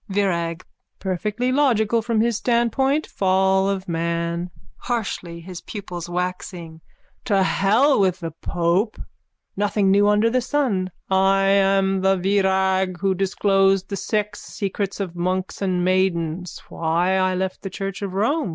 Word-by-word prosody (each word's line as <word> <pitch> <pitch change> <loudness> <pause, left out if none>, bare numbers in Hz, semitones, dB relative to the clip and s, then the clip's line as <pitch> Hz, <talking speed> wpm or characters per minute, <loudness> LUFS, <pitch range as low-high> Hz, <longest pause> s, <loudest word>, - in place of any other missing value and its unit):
VIRAG: 180 -4 -1 0.3
Perfectly 210 +6 -2
logical 235 -5 +2
from 225 -1 0
his 235 0 +1
standpoint. 255 +6 +1
Fall 190 0 +2
of 195 -1 -3
man. 170 +1 -2 0.3
(Harshly, 195 -8 -4
his 180 0 -9
pupils 180 -5 -7
waxing.) 175 -2 -4 0.4
To 200 -4 +2
hell 220 +9 +3
with 185 -2 +2
the 165 -2 -5
pope! 175 +6 -1 0.6
Nothing 205 -1 +1
new 200 +1 +4
under 210 +2 +3
the 255 +1 +2
sun. 235 -9 0 0.2
I 195 +1 +3
am 195 -1 +3
the 190 0 +3
Virag 190 -1 +1
who 195 +1 +1
disclosed 195 0 +2
the 200 - -3
Sex 210 0 -2
Secrets 200 0 -4
of 185 -3 -4
Monks 185 +2 -2
and 180 -2 0
Maidens. 180 -2 -1
Why 170 +3 0
I 185 0 +1
left 185 0 -3
the 195 - -5
church 195 +1 -5
of 195 -2 -4
Rome. 225 - +1
190 Hz, 140 wpm, -22 LUFS, 180-205 Hz, 0.6 s, new